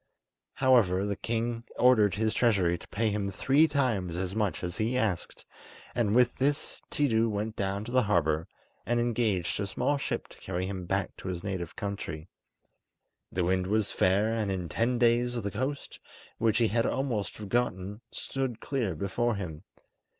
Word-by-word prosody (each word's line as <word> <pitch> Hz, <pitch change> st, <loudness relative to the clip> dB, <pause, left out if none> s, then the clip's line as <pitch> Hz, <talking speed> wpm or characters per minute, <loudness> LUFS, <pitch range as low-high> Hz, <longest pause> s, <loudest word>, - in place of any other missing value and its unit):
However, 110 Hz, -8 st, +4 dB
the 100 Hz, -1 st, -1 dB
king 115 Hz, +2 st, -2 dB
ordered 110 Hz, -6 st, +5 dB
his 110 Hz, +1 st, +1 dB
treasure 95 Hz, -8 st, +3 dB
to -, -, -11 dB
pay 110 Hz, +1 st, 0 dB
him 100 Hz, -1 st, -1 dB
three 135 Hz, -, +3 dB
times 115 Hz, -, 0 dB
as 90 Hz, +2 st, -3 dB
much 105 Hz, -4 st, -1 dB
as 90 Hz, -1 st, -3 dB
he 115 Hz, +4 st, 0 dB
asked, 105 Hz, -8 st, -2 dB, 0.5 s
and 110 Hz, -3 st, +1 dB
with 125 Hz, 0 st, +4 dB
this 145 Hz, +2 st, -1 dB
Tiidu 115 Hz, -6 st, +2 dB
went 105 Hz, +1 st, -2 dB
down 100 Hz, +1 st, -2 dB
to 120 Hz, -, -7 dB
the 130 Hz, 0 st, +4 dB
harbour 80 Hz, -7 st, +1 dB, 0.4 s
and 120 Hz, 0 st, +1 dB
engaged 115 Hz, -8 st, 0 dB
a 100 Hz, -, -1 dB
small 145 Hz, +8 st, 0 dB
ship -, -, -3 dB
to -, -, -16 dB
carry 95 Hz, 0 st, -3 dB
him 95 Hz, -2 st, -5 dB
back 95 Hz, 0 st, -1 dB
to -, -, -8 dB
his 90 Hz, -1 st, -4 dB
native 95 Hz, -4 st, -4 dB
country. 95 Hz, -5 st, -5 dB, 1.0 s
The 90 Hz, -, 0 dB
wind 90 Hz, +1 st, +1 dB
was 105 Hz, 0 st, +1 dB
fair, 100 Hz, +4 st, +2 dB
and 110 Hz, -3 st, 0 dB
in 90 Hz, -3 st, -3 dB
ten 120 Hz, +2 st, +1 dB
days 120 Hz, 0 st, +3 dB
the 100 Hz, -2 st, -3 dB
coast, 130 Hz, +6 st, -4 dB, 0.4 s
which 110 Hz, -1 st, +3 dB
he 115 Hz, -2 st, +3 dB
had 115 Hz, +1 st, +2 dB
almost 120 Hz, -8 st, -1 dB
forgotten, 105 Hz, -2 st, -2 dB
stood 130 Hz, -4 st, -3 dB
clear 115 Hz, -11 st, -1 dB
before 110 Hz, +7 st, 0 dB
him. 80 Hz, -6 st, -5 dB
105 Hz, 170 wpm, -29 LUFS, 95-120 Hz, 1.0 s, ordered